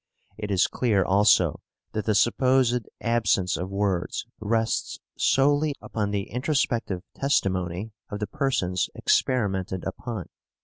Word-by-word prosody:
It 105 -1 -5
is 95 -2 +3
clear 105 -7 +1
also 100 +3 +4 0.3
that 110 -1 -3
the 110 - +2
supposed 125 +1 +2
absence 105 -6 +1
of 90 +2 -4
words 100 -2 -1
rests 110 +1 -1 0.2
solely 145 +2 +2
upon 105 -2 -3
the 100 -1 -2
introspective 120 - -1
testimony 95 -6 0 0.2
of 105 - -4
the 105 - -2
persons 105 - 0
experimented 95 -7 0
upon. 100 +1 -5
105 Hz, 120 wpm, -26 LUFS, 95-125 Hz, 0.3 s, also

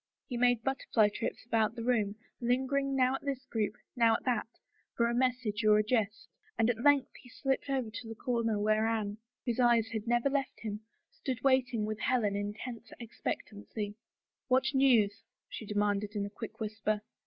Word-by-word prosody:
He 250 - -5
made 245 -1 +3
butter 270 0 -2
fly 215 -3 +5
trips 225 +2 -4
about 225 -1 +1
the 230 - -5
room, 220 -4 +1 0.2
lingering 265 +3 +1
now 255 -1 +3
at 270 - -3
this 270 -2 -3
group, 220 -3 -1 0.2
now 230 -2 +5
at - - -4
that, 240 -4 +1 0.5
for 235 - +4
a 235 - 0
message 245 -4 0
or 210 0 +6
a 215 - +3
jest, 220 -1 0 0.3
and 225 +2 +4
at 230 -1 -6
length 285 -2 +4
he 250 - -15
slipped 270 +3 -1
over 260 -5 -1
to 230 - -7
the 225 - -6
comer 230 -3 0
where 215 +1 +2
Anne, 215 -2 -1 0.3
whose 240 -1 -1
eyes 235 -2 +4
had 225 -1 -4
never 240 +2 +3
left 275 -2 -1
him, 210 -2 -4 0.3
stood 255 -4 -4
waiting 255 -5 +3
with 215 0 -3
Helen, 215 -4 +1
in 205 +1 -2
tense 235 +1 -7
ex 235 -2 -11
pectancy. 205 0 -4 0.5
"What 260 +1 +3
news?" 230 -6 +4 0.3
she 220 - -8
demanded 205 0 0
in 200 -1 0
a 200 - -7
quick 220 +1 -8
whisper. 215 -1 -1
230 Hz, 190 wpm, -32 LUFS, 215-255 Hz, 0.5 s, or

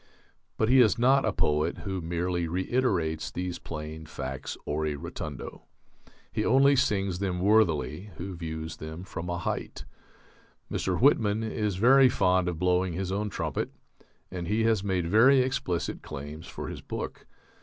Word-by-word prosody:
But 110 - +2
he 130 +3 +6
is 115 -4 +5
not 135 +3 +4
a 110 - +2
poet 75 -4 +1
who 95 -2 -3
merely 85 +1 -1
reiterates 90 -4 0
these 90 -1 -4
plain 80 0 -7
facts 65 -2 -5
ore 75 +1 -1
rotundo. 75 -1 -6 0.7
He 105 - -1
only 135 +4 +5
sings 100 -8 +1
them 95 -3 -1
worthily 90 - +2
who 95 +1 -5
views 80 -1 -5
them 80 +3 -7
from 90 -2 -6
a 85 - -1
height.... 85 - -4 0.9
Mr. 95 -2 -1
Whitman 110 -5 +3
is 105 -3 -1
very 130 +6 +6
fond 95 -5 +2
of 90 -2 -2
blowing 90 0 +1
his 95 +2 -3
own 105 +2 -1
trumpet, - - -3 0.6
and 90 -2 -4
he 110 +3 +1
has 110 -3 +2
made 95 -4 0
very 120 +9 +6
explicit 125 -9 -2
claims 75 +4 -8
for - - -6
his - - -7
book.... - - -6
90 Hz, 155 wpm, -28 LUFS, 80-110 Hz, 0.9 s, he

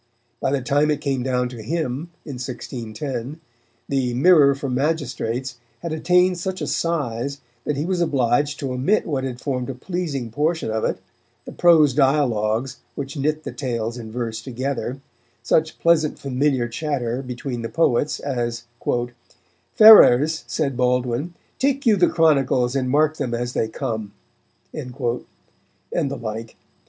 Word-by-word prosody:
By - - 0
the 140 -2 0
time 145 +4 +2
it 150 -1 +1
came 135 -4 -1
down 125 -1 0
to 120 -3 -9
him, 155 +3 -3 0.2
in 140 -5 -6
1610, 125 +2 -5 0.5
the 130 -3 0
Mirror 145 -1 +6
for 140 0 -5
Magistrates 130 -3 -2 0.2
had 170 -2 -3
attained 180 +2 +3
such 190 +2 -3
a 150 - -2
size 140 -5 -2 0.3
that 150 - -1
he 150 - -1
was 180 -1 0
obliged 145 -2 +1
to 135 -2 -2
omit 135 +12 +1
what 140 -5 -2
had 125 -2 -4
formed 130 -2 -3
a 135 - -4
pleasing 140 - -4
portion 155 0 0
of 110 0 -1
it, - - 0 0.5
the - - -8
prose 160 -6 +5
dialogues 130 -3 +1 0.2
which 140 +2 -5
knit 155 +2 -1
the - - -5
tales 115 -4 -3
in 110 -2 -8
verse 115 -1 -4
together, 130 +1 -4 0.4
such 155 +6 +1
pleasant 160 -3 +2
familiar 135 -2 0
chatter 125 -1 -2
between 125 -1 -5
the 115 - -4
poets 145 -3 +1
as 120 -4 -3 1.1
"Ferrers, 160 - +8
said 140 -5 -1
Baldwin, 125 +5 0 0.2
take 275 0 +1
you 225 -3 +5
the 180 -3 +4
chronicles 135 -6 +2
and 130 -2 0
mark 155 +3 +2
them 125 -5 -2
as 120 +1 -3
they 110 - 0
come," 110 -4 -4 0.6
and 125 -1 -6 1.2
the 140 - -4
like. 115 -1 -6
135 Hz, 150 wpm, -22 LUFS, 120-155 Hz, 1.2 s, Ferrers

